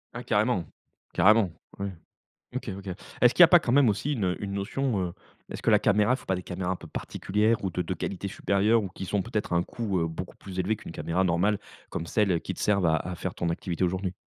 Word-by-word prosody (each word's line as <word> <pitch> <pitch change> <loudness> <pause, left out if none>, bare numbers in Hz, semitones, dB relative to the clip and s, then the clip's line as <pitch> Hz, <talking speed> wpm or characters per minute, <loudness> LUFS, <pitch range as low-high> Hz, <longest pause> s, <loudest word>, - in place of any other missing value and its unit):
Ah - - -5
carrément. - - +1 0.5
Carrément. 105 -2 +5 0.3
Ouais, 100 0 -2 0.6
OK, 130 - -3
OK. 100 0 -10 0.3
Est-ce 120 0 +6
qu'il - - +4
y - - +14
a - - +10
pas 175 0 +7
quand 120 - -2
même 135 -3 +5
aussi 145 +8 0
une, 105 -7 -1
heu, 90 +3 -1
une 100 0 -3
notion, 105 +3 -1
heu, - - -10 0.4
est-ce - - -6
que - - +3
la 105 - +6
caméra 105 +3 +3
il - - +1
faut - - -15
pas 95 - +1
des 90 - -5
caméras 90 0 -4
un - - 0
peu 85 - -11
particulières 105 +7 0
ou 95 - -1
de 90 - -1
de 90 +2 -2
qualité 100 +3 -4
supérieure 105 +4 +2
ou 95 - -4
qui 95 - -7
sont 100 +1 0
peut-être 105 -5 -2
un 85 0 +3
coût, 105 -6 -2
heu, 80 - +1
beaucoup 80 +3 -6
plus 95 -1 -7
élevé 105 +4 +1
qu'une - - -10
caméra 85 +4 -1
normale 95 +4 +2 0.3
comme 85 - -4
celles 95 -3 +1
qui - - -4
te - - -11
servent 100 -4 +2
à 80 -1 +4
à 90 +3 -4
faire 90 +1 -4
ton 85 - -1
activité 85 +1 -2
aujourd'hui? 90 +1 -1
100 Hz, 250 wpm, -27 LUFS, 90-105 Hz, 0.6 s, y